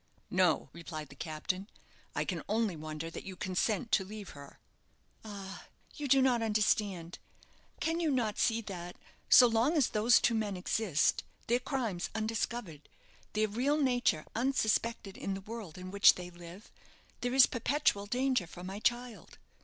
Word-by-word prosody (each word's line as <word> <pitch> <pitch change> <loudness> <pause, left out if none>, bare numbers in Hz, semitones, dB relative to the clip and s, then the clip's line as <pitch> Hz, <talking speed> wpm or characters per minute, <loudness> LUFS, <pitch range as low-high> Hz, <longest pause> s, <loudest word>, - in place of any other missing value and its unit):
"No," 180 -3 +2
replied 155 -3 -7
the 140 - -13
captain; 175 +6 -4 0.5
"I - - 0
can - - -3
only 215 -4 +1
wonder 155 +1 -6
that - - -7
you 190 - -7
consent 205 +6 -1
to 195 - +3
leave 205 +1 -8
her." 140 -1 -12 0.7
"Ah, 200 -3 -8 0.3
you 295 -2 -4
do 270 0 +5
not 250 -3 +3
understand. 205 -5 0 0.6
Can 330 +1 0
you 330 -2 +1
not 235 -6 0
see 230 -1 +2
that, 175 -4 -7 0.3
so 250 - +9
long 240 +7 +2
as 280 - +3
those 220 +2 +4
two 235 - +2
men 210 -4 -1
exist, 180 -4 +1 0.2
their 240 +1 +2
crimes 235 -9 -2
undiscovered, 220 -7 -3 0.4
their 215 +1 +2
real 255 +8 +1
nature 245 - +1
unsuspected 230 -4 0
in 195 - -3
the 195 - -7
world 210 -5 -8
in 185 0 -7
which 200 0 +7
they 180 0 -8
live, 175 +3 -12 0.5
there 245 +1 -2
is 265 -2 +9
perpetual 235 -4 0
danger 250 -4 +1
for 175 +2 -10
my 190 +2 -6
child? 240 +1 -2
210 Hz, 160 wpm, -32 LUFS, 180-240 Hz, 0.7 s, so